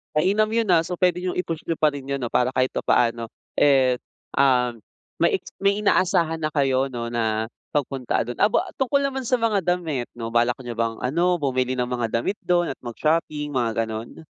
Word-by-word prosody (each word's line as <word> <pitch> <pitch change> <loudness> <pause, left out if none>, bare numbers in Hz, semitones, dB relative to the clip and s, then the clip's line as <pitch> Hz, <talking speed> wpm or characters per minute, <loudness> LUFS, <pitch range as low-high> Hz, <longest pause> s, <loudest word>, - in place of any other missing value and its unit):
Mainam 195 +7 +3
yun, 230 -2 +1
ah, 165 -2 +4
so 180 - -4
pwede 180 0 +2
nyong 180 - -1
i-push 165 -3 -6
niyo 165 - 0
pa 155 -1 +3
rin 140 -2 -7
yun 140 0 -3
'no, 120 - -2
para 125 +1 +1
kahit 130 0 +2
papaano, 115 -1 +1 0.3
eh, 130 -3 +4 0.4
ah, 130 -3 +4 0.5
may - - +2
eks - - -12
may 200 +1 +1
inaasahan 175 -5 +2
na 155 -1 -3
kayo 135 -2 +2
'no, 120 -3 -5
na 110 -1 -1 0.2
pagpunta 135 -3 -1
dun, 120 - -5
aba, 210 - +2
tungkol 275 +1 +2
naman 270 -2 -2
sa 250 0 +1
mga 210 -6 +1
damit 165 -8 -1
'no, 115 -1 -5
balak 120 +1 +2
niyo 120 -2 -7
bang 115 -1 -1
ano 170 +6 +1
bumili 130 -2 0
ng 125 -1 -1
mga 120 -3 -2
damit 200 +10 -2
dun 175 -1 +2
at 135 - -5
mag 120 - -5
shopping, 150 -1 0
mga 120 -5 0
gano'n? 110 +7 -7
140 Hz, 200 wpm, -23 LUFS, 125-175 Hz, 0.5 s, ah